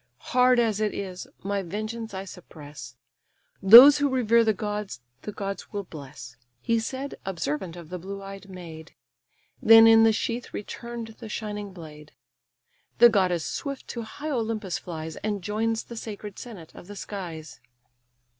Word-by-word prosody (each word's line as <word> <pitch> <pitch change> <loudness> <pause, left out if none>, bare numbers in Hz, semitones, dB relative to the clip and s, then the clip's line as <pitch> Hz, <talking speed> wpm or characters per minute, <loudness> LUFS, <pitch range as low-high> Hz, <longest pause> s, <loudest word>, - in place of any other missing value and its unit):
Hard 250 -1 +5
as 220 -3 +1
it 215 -1 -1
is, 185 -2 -6 0.2
my 200 +1 -1
vengeance 215 +5 -5
I 190 0 -6
suppress: 145 - -11 0.7
Those 245 +9 +10
who 285 0 +2
revere 235 -3 +3
the 220 - +3
gods 210 - -4 0.2
the 210 - -6
gods 200 -1 -6
will 205 -1 -4
bless." 140 -8 -11 0.2
He 230 - +1
said, 265 +5 -5
observant 170 -2 -3
of 170 -3 -11
the 180 0 -5
blue 195 +3 -7
eyed 195 0 -10
maid; 165 -3 -10 0.7
Then 225 0 +9
in 225 0 +7
the 225 - +6
sheath 230 +2 -3
return'd 235 +2 -6
the 225 - -9
shining 210 -2 -5
blade. 155 -4 -12 0.8
The 240 - +8
goddess 185 -6 +1
swift 275 -2 -5
to 235 - -4
high 290 +7 -6
Olympus 220 - -2
flies, 160 -2 -7
And 205 -3 -3
joins 225 +3 -1
the 235 - -10
sacred 210 -2 -7
senate 200 -10 -10
of - - -13
the 205 - -9
skies. 175 -7 -7
205 Hz, 155 wpm, -26 LUFS, 180-225 Hz, 0.8 s, Those